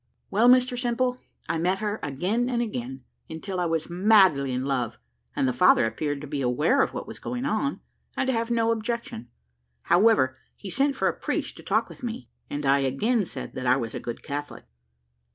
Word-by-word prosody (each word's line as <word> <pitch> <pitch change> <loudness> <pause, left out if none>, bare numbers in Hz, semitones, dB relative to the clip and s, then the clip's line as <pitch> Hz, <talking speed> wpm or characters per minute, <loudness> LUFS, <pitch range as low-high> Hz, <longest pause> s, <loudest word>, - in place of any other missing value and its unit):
"Well, 225 +5 +5
Mr 250 0 +5
Simple, 250 +1 0 0.3
I 165 0 -1
met 180 +3 +1
her 210 +1 -3
again 185 - -1
and 240 -2 0
again, 135 - -4 0.3
until 180 +4 -5
I 175 - +1
was 165 -1 -1
madly 180 -7 +4
in 125 +1 -2
love, 125 -5 -1 0.4
and 130 - +1
the 130 - +1
father 120 - +5
appeared 145 +5 -2
to 150 - -7
be 140 0 -3
aware 150 - +2
of - - +1
what - - -5
was - - -9
going 250 +1 -4
on, 280 -1 -1 0.4
and - - +1
to 265 - +1
have 230 0 -1
no 230 -1 +2
objection. 230 - -4 0.5
However, 175 -9 +3 0.2
he 195 - -8
sent 275 +4 +1
for - - +1
a - - +1
priest - - -3
to - - -9
talk - - +1
with - - -13
me, 240 0 -5 0.2
and 145 0 -4
I 135 +1 +4
again 195 - +1
said - - -7
that 130 -1 -4
I 125 - +5
was 115 -4 -3
a - - -4
good 120 - -6
Catholic. 145 +1 -6
180 Hz, 205 wpm, -26 LUFS, -, 0.5 s, Well